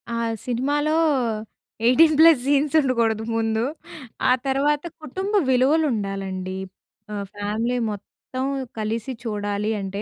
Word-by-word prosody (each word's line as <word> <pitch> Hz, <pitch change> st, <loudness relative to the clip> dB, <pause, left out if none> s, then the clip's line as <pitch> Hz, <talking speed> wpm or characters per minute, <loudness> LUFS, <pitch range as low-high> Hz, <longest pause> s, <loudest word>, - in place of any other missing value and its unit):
ఆ -, -, -1 dB, 0.3 s
సినిమాలో 290 Hz, +5 st, 0 dB, 0.9 s
18 310 Hz, +6 st, +6 dB
plus 325 Hz, -3 st, +8 dB
scenes 285 Hz, +2 st, +2 dB
ఉండకూడదు 230 Hz, -5 st, +1 dB
ముందు. 225 Hz, 0 st, 0 dB, 0.7 s
ఆ -, -, +5 dB, 0.2 s
తర్వాత 285 Hz, +2 st, +2 dB, 0.2 s
కుటుంబ 380 Hz, +8 st, -4 dB, 0.2 s
విలువలు 275 Hz, +5 st, +3 dB
ఉండాలండి. 195 Hz, -3 st, -4 dB, 0.6 s
ఆహ్, 200 Hz, -1 st, -3 dB
ఫ్యామిలీ 215 Hz, +4 st, -1 dB
మొత్తం 210 Hz, +5 st, -7 dB, 0.4 s
కలిసి 225 Hz, +4 st, -2 dB
చూడాలి 205 Hz, -1 st, -2 dB
అంటే, 195 Hz, +1 st, -4 dB
235 Hz, 110 wpm, -23 LUFS, 210-285 Hz, 0.9 s, plus